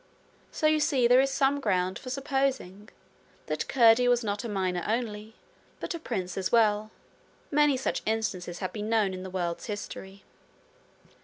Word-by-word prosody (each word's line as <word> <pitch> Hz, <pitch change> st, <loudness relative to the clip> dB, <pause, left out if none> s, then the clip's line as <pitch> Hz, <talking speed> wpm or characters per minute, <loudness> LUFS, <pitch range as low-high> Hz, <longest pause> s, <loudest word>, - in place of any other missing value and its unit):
So -, -, -3 dB
you 310 Hz, 0 st, +4 dB
see 280 Hz, -5 st, +3 dB
there 250 Hz, +2 st, +6 dB
is 270 Hz, -, +1 dB
some 275 Hz, +1 st, +1 dB
ground 185 Hz, -6 st, 0 dB
for 255 Hz, -, -8 dB
supposing 260 Hz, -7 st, -2 dB, 0.6 s
that -, -, -3 dB
Curdie 240 Hz, -1 st, +5 dB
was 245 Hz, -1 st, +3 dB
not 205 Hz, 0 st, -2 dB
a 235 Hz, -, -4 dB
miner 185 Hz, -3 st, -1 dB
only, 220 Hz, -1 st, -3 dB, 0.4 s
but -, -, -4 dB
a 335 Hz, -, -5 dB
prince 190 Hz, -, -4 dB
as 185 Hz, -, -2 dB
well. 215 Hz, -2 st, +3 dB, 0.6 s
Many 295 Hz, -2 st, +4 dB
such 260 Hz, -, -2 dB
instances 195 Hz, -6 st, -2 dB
have 185 Hz, -, -4 dB
been 210 Hz, 0 st, -4 dB
known 215 Hz, -4 st, +2 dB
in 185 Hz, -, -6 dB
the 190 Hz, -, -7 dB
world's 175 Hz, 0 st, -3 dB
history. 200 Hz, -2 st, -7 dB
220 Hz, 165 wpm, -28 LUFS, 190-260 Hz, 0.6 s, there